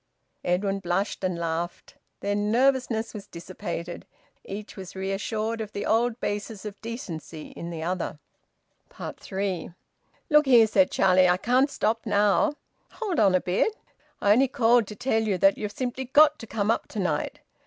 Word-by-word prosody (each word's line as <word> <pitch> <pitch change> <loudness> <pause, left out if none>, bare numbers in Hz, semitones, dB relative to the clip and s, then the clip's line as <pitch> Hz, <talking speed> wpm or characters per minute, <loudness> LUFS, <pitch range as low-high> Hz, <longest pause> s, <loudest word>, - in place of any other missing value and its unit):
Edwin 195 +2 0
blushed 190 +2 -2
and 185 -2 0
laughed. 170 +1 -4 0.3
Their 205 - -1
nervousness 230 +2 +1
was 210 -3 -8
dissipated. 170 0 -6 0.4
Each 205 +2 -7
was 190 -2 -9
reassured 215 +4 -2
of 215 -1 -6
the 200 - -3
old 235 +1 +1
basis 205 0 -4
of 210 -1 -7
`decency' 170 -9 -7
in 170 - -7
the 165 -2 -5
other. 175 -2 -2 0.7
THREE. 190 -3 -4 0.5
"Look 300 -1 +5
here," 240 -4 +7
said 195 -3 +3
Charlie. 185 -1 +4
"I 180 - +4
can't 250 +7 +2
stop 225 -4 -1
now." 205 +6 +3 0.4
"Hold 415 -7 -2
on 195 -4 +5
a 185 - +3
bit." 190 - +1 0.5
"I 205 - +5
only 260 +6 +5
called 235 -3 +3
to 210 - -8
tell 245 -1 +1
you 210 -4 0
that 195 +2 +4
you've 210 -1 -3
simply 255 +3 -3
got 295 +3 +5
to 225 - -9
come 215 -1 0
up - - -1
to 215 - -6
night." 170 -6 -2
205 Hz, 165 wpm, -26 LUFS, 185-230 Hz, 0.7 s, here